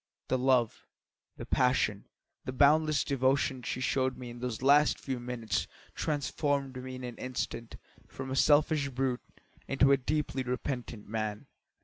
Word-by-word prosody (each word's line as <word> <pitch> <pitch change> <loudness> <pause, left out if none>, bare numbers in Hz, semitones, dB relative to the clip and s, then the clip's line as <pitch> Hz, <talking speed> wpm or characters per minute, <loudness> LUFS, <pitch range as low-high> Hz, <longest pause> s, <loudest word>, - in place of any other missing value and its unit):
The 130 - +2
love, 125 -3 +2 0.5
the - - -6
passion, 125 -6 +1 0.4
the - - -3
boundless 150 +3 +4
devotion 135 -1 +1
she 125 - -3
showed 130 0 0
in 120 -1 -8
those 125 -1 -4
last 145 +2 +5
few 130 -2 -4
minutes 120 -3 -2 0.3
transformed 140 -2 -1
me 130 0 -6
in 130 - -8
an 120 -1 -6
instant 125 -2 -4 0.3
from 135 0 -7
a - - -1
selfish 145 0 +4
brute 130 -1 -1 0.5
into 135 0 +4
a 140 - +6
deeply 145 0 -1
repentant 125 -3 -4
man. 105 -1 -3
130 Hz, 140 wpm, -30 LUFS, 125-140 Hz, 0.5 s, a